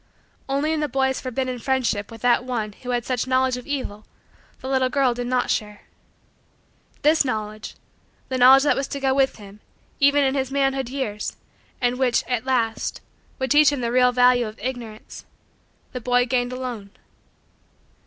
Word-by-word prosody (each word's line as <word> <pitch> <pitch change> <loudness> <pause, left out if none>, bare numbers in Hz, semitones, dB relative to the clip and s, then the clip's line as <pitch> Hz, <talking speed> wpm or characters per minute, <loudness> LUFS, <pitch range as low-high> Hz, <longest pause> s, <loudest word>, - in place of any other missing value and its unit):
Only 285 +3 0
in 315 - -1
the 300 - 0
boy's 265 +1 0
forbidden 255 0 -3
friendship 235 -5 -1
with 225 0 -12
that 245 0 +3
one 235 -4 -3
who 250 +5 -11
had 245 -2 -1
such 255 -1 -2
knowledge 260 0 +2
of 250 +2 -9
evil 255 -7 -4 0.6
the 260 - -8
little 260 -1 +1
girl 265 -2 +2
did 245 0 -4
not 250 0 0
share. 210 -1 -3 1.2
This 310 +1 +4
knowledge 215 -4 -4 0.5
the 260 -1 -2
knowledge 265 +2 +8
that 295 - +3
was 275 0 -2
to 280 - -5
go 270 -1 +1
with 270 0 +2
him, 205 -1 -13 0.4
even 285 +1 +4
in 265 -1 +1
his 265 -2 -1
manhood 270 -2 0
years, 235 -6 -4 0.4
and 245 0 0
which, 250 -3 +2
at 245 -1 -2
last, 230 -4 -1 0.4
would 260 -2 -3
teach 295 -1 +6
him 285 -3 -3
the 235 -1 -1
real 250 0 +4
value 245 -1 +4
of 215 - -10
Ignorance 230 -2 -7 0.7
the 250 - -5
boy 245 +1 +2
gained 245 -1 0
alone. 250 -5 -6
255 Hz, 175 wpm, -23 LUFS, 235-265 Hz, 1.2 s, knowledge